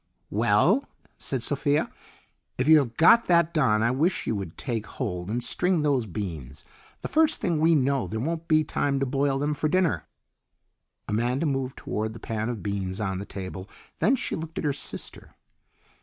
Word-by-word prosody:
"Well," 120 - +3 0.3
said 130 -4 -3
Sophia, 145 +3 +1 0.7
"if 130 - 0
you 155 0 +8
have 120 -5 -3
got 205 +8 +6
that 170 -2 +3
done 110 -8 +3
I 115 - +3
wish 155 +8 0
you 115 - -1
would 95 -5 -6
take 115 -5 -3
hold 90 -8 -4
and 120 +3 -2
string 180 +1 +1
those 135 -6 +1
beans. 80 - -6 0.4
The - - -3
first 315 0 +2
thing 175 -7 0
we 165 +1 +4
know 135 -2 +1
there 110 - -4
won't 165 +6 -3
be 155 -1 +4
time 140 -2 -1
to 135 - +1
boil 135 +1 0
them 145 +2 0
for 155 +1 -1
dinner." 185 -1 +1 1.0
Amanda 120 +7 0
moved 135 -3 -2
toward 110 +1 -3
the 115 - -10
pan 110 0 -3
of 115 -5 -5
beans 100 -1 -3
on 95 -3 -2
the 100 - -6
table, 95 0 -7 0.3
then 260 - +4
she - - -3
looked 160 0 -7
at - - -2
her 145 - +1
sister. - - -6
135 Hz, 185 wpm, -26 LUFS, 110-155 Hz, 1.0 s, you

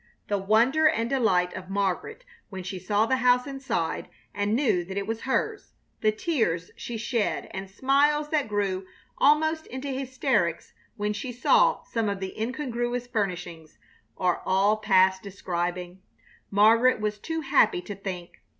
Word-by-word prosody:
The 205 -1 +1
wonder 235 +10 +4
and 230 -6 +1
delight 185 -9 +2
of 185 0 -8
Margaret 200 - -2 0.2
when 190 -3 -7
she 185 +1 -5
saw 205 +4 +1
the 260 +3 +1
house 250 0 +3
inside 270 - -3 0.2
and 205 +1 0
knew 235 -9 +2
that 190 +3 -7
it 200 - -1
was 225 +1 -4
hers, 420 +11 -2 0.2
the 215 - +3
tears 215 - -1
she 235 - -6
shed 230 -1 -1
and 190 0 -6
smiles 285 +7 +2
that 300 -3 0
grew 195 -3 -2 0.3
almost 315 +2 +3
into 260 +3 -6
hysterics 260 - -1 0.2
when 210 0 -1
she 245 +5 -5
saw 485 - +3
some 225 -3 -2
of 200 -1 -3
the 190 -1 -5
incongruous 245 -1 -2
furnishings, 180 -8 -4 0.4
are 180 -1 0
all 195 +3 +3
past 190 -3 +3
describing. 180 -1 -4 0.5
Margaret 225 +5 +5
was 210 0 -2
too 325 +7 -3
happy 270 - +3
to 205 - -6
think. 185 -3 -7
215 Hz, 150 wpm, -26 LUFS, 190-260 Hz, 0.5 s, Margaret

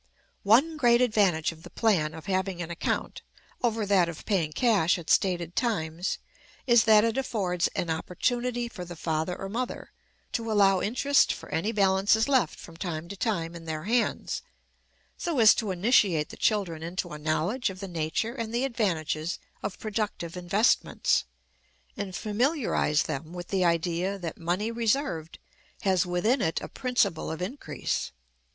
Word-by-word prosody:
One 270 +10 +4
great 240 -4 +4
advantage 200 -10 +2
of 160 -1 -14
the - - -11
plan 165 -9 +1
of 160 - -10
having 190 -1 -1
an 170 -1 -4
account 170 - -2 0.4
over 225 -3 0
that 190 -4 +3
of 165 - -8
paying 175 -7 0
cash 200 -4 +3
at 170 -2 -4
stated 175 -3 +1
times 175 -7 -1 0.5
is, 235 -3 +5
that 215 -2 +6
it 230 +3 +1
affords 185 -9 0
an 170 - -1
opportunity 240 +9 -1
for 210 -6 -8
the 175 0 -8
father 160 +2 -2
or 195 - -4
mother 240 +5 -4 0.4
to 230 -1 -2
allow 195 -3 +4
interest 275 +6 +3
for - - -7
any 165 +8 -1
balances 200 +1 +3
left 265 -3 +2
from 165 -1 -12
time 170 -2 -4
to 200 - -6
time 185 -6 -1
in 170 -1 -10
their 155 -1 -4
hands, 230 +4 0 0.8
so 335 -4 -2
as 220 -3 +8
to 220 - -2
initiate 185 - +3
the - - -9
children 190 -7 0
into 175 +2 -4
a 150 - -7
knowledge 170 - 0
of 190 -1 -8
the 195 - -5
nature 170 +6 -2
and 230 -4 -4
the 240 +3 0
advantages 170 - -1 0.2
of 185 - -4
productive 210 -6 -3
investments, 195 - +2 0.7
and 195 -2 -5
familiarize 220 - +1
them 155 +2 -5
with 175 -1 -7
the 190 -2 +1
idea 175 +3 0
that 170 -4 -6
money 180 +7 -1
reserved 230 - -1 0.4
has 190 -4 +2
within 215 +9 +1
it 160 - 0
a - - -7
principle 245 -10 0
of 160 - -4
increase. 210 +11 -3
195 Hz, 160 wpm, -27 LUFS, 170-225 Hz, 0.8 s, as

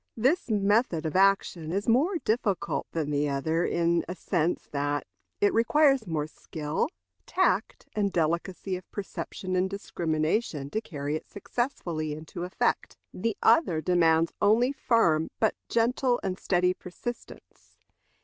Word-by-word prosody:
This 265 - +2
method 205 -5 +2
of 160 - -3
action 190 -4 +2
is 200 +3 -2
more 290 +11 +3
difficult 215 -5 0
than 155 -3 -2
the 145 0 +1
other 160 +5 0
in 170 0 +1
the 180 - -4
sense 175 -1 -1
that 145 0 -1 0.3
it 205 - +3
requires 270 +1 +3
more 155 -3 -1
skill, 155 - -3 0.4
tact, 375 - 0
and 205 -2 +1
delicacy 175 +3 -1
of 180 0 -9
perception 185 -2 -5
and 185 +1 +1
discrimination 160 -4 -1
to 220 - -1
carry 145 -6 -4
it 155 - -6
successfully 175 - -3
into 155 +3 -6
effect. 180 - -1 0.2
The 225 +3 -2
other 180 - +4
demands 165 -1 +3
only 235 +5 +4
firm, 225 - +2
but 220 - +3 0.2
gentle 240 +2 +2
and 185 0 -2
steady 180 0 +2
persistence. 190 +7 -9
180 Hz, 135 wpm, -28 LUFS, 160-220 Hz, 0.4 s, other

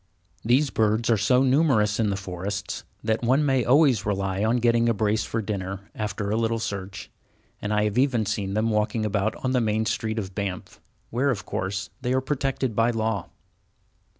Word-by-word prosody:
These 130 +4 +3
birds 110 +2 +1
are - - +5
so 125 +5 +3
numerous 130 -7 +3
in 110 -2 +2
the 100 - 0
forests 95 +1 -5 0.2
that 110 0 0
one 130 +5 +3
may 135 -3 +2
always 130 -3 +4
rely 95 -1 -1
on 115 +3 +2
getting 120 0 +3
a 115 - +1
brace 110 +1 +1
for 115 -1 -2
dinner, 95 -1 -5
after 105 -1 -3
a - - +1
little 115 0 +1
search, 100 -3 -5 0.5
and 105 - -3
I 105 0 +2
have 105 +3 0
even 125 -5 +2
seen 100 -1 -2
them 110 +1 +1
walking 110 +1 0
about 105 0 0
on 130 - +1
the 125 -1 +2
main 110 0 0
street 110 0 -2
of 95 -3 -4
Banff, 95 -3 -5 0.3
where, 130 +5 +1
of 120 -7 -2
course, 95 +1 -3
they 125 0 0
are 130 - +3
protected 135 -3 -1
by 115 +2 +3
law. 110 -2 -1
110 Hz, 190 wpm, -25 LUFS, 100-120 Hz, 0.5 s, are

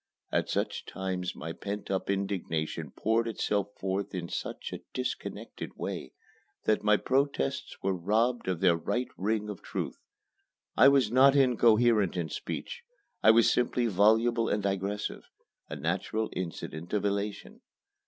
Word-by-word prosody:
At - - 0
such - - -2
times 95 -1 -3
my 80 +1 -5
pent 100 +2 -5
up 95 0 -1
indignation 85 -6 -2
poured 115 - 0
itself 105 -2 0
forth 95 +1 -2
in 85 -2 -4
such - - -5
a - - -6
disconnected - - -5
way - - -5 0.5
that 110 - +2
my 105 0 +5
protests 135 - 0
were 95 0 +1
robbed 110 +7 +1
of 90 -3 -1
their 90 -3 +5
right 120 +9 -2
ring 105 +2 -1
of 105 -3 -6
truth. - - -4 0.8
I 135 - +7
was 135 -6 +4
not 135 +3 +6
incoherent 115 -6 +4
in 85 -3 -2
speech. 480 -1 -5 0.4
I - - +6
was 115 +1 +6
simply 125 0 +1
voluble 115 +3 +3
and 105 - 0
digressive 100 +1 -2 0.5
a - - -4
natural 110 0 -2
incident 85 -1 -5
of 105 -1 +1
elation. 100 +1 -3
105 Hz, 145 wpm, -29 LUFS, 95-115 Hz, 0.8 s, I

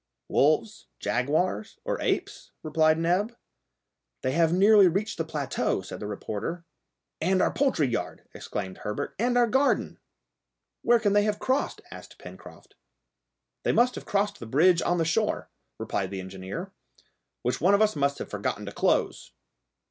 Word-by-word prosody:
"Wolves, 155 +10 +1
jaguars, 140 - -1
or - - -2
apes?" - - -2
replied 155 0 +3
Neb. 185 +8 0 0.9
"They 130 - +1
have 165 +3 +3
nearly 200 +2 +6
reached 195 +4 -1
the - - +1
plateau," 140 -9 -2
said 90 - -8
the 105 - -5
reporter. 110 - -5 0.6
"And 185 +3 +2
our - - +2
poultry 265 - +2
yard," 120 - -4
exclaimed 95 -2 -6
Herbert, 105 0 -4
"and 245 +2 +2
our 240 - +5
garden!" 265 +5 +1 0.8
"Where 240 0 +4
can 205 -3 +1
they 205 - +5
have 210 -1 0
crossed?" 265 +2 -1
asked - - -11
Pencroft. - - -13 0.9
"They - - +1
must 245 +1 +3
have - - -9
crossed 205 0 0
the 115 - -8
bridge 170 +8 +4
on 175 - +1
the 165 - +1
shore," 210 +7 -1 0.3
replied 95 -1 -2
the 95 -1 -5
engineer, 95 +1 -7 0.7
"which 125 - -1
one 190 +5 +5
of 200 - +2
us 215 -4 +1
must 140 -1 0
have - - -7
forgotten - - -3
to - - -6
close." - - 0
170 Hz, 155 wpm, -27 LUFS, 130-210 Hz, 0.9 s, nearly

